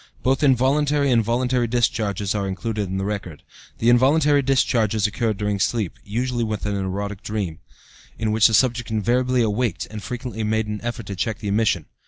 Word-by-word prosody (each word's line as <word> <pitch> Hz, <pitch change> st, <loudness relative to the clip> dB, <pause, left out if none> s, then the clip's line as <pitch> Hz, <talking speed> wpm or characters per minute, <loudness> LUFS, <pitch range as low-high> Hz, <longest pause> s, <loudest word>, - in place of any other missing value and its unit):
Both 130 Hz, +3 st, +2 dB
involuntary 140 Hz, +1 st, +3 dB
and 115 Hz, -2 st, +4 dB
voluntary 125 Hz, +2 st, 0 dB
discharges 110 Hz, -4 st, 0 dB
are 100 Hz, -2 st, -1 dB
included 105 Hz, +1 st, -3 dB
in 95 Hz, -, -3 dB
the 95 Hz, -, -2 dB
record. 100 Hz, -7 st, -5 dB, 0.3 s
The 115 Hz, -, +2 dB
involuntary 145 Hz, +4 st, +4 dB
discharges 115 Hz, -6 st, +1 dB
occurred 110 Hz, 0 st, -1 dB
during 105 Hz, -1 st, -1 dB
sleep, 105 Hz, -2 st, -1 dB
usually 120 Hz, +3 st, -2 dB
with 110 Hz, -3 st, -3 dB
an 105 Hz, -1 st, -1 dB
erotic 100 Hz, +1 st, -3 dB
dream, 100 Hz, -7 st, -4 dB, 0.6 s
in 110 Hz, -1 st, -1 dB
which 110 Hz, 0 st, +5 dB
the 110 Hz, -, +2 dB
subject 120 Hz, 0 st, +2 dB
invariably 120 Hz, +3 st, +1 dB
awaked 110 Hz, -3 st, -1 dB
and 110 Hz, -1 st, -6 dB
frequently 115 Hz, +1 st, -5 dB
made 110 Hz, +1 st, 0 dB
an 105 Hz, -1 st, -5 dB
effort 120 Hz, -2 st, -4 dB
to 100 Hz, -, -5 dB
check 110 Hz, +3 st, -2 dB
the 105 Hz, -2 st, -5 dB
emission. 100 Hz, -6 st, +1 dB
110 Hz, 180 wpm, -22 LUFS, 100-125 Hz, 0.6 s, which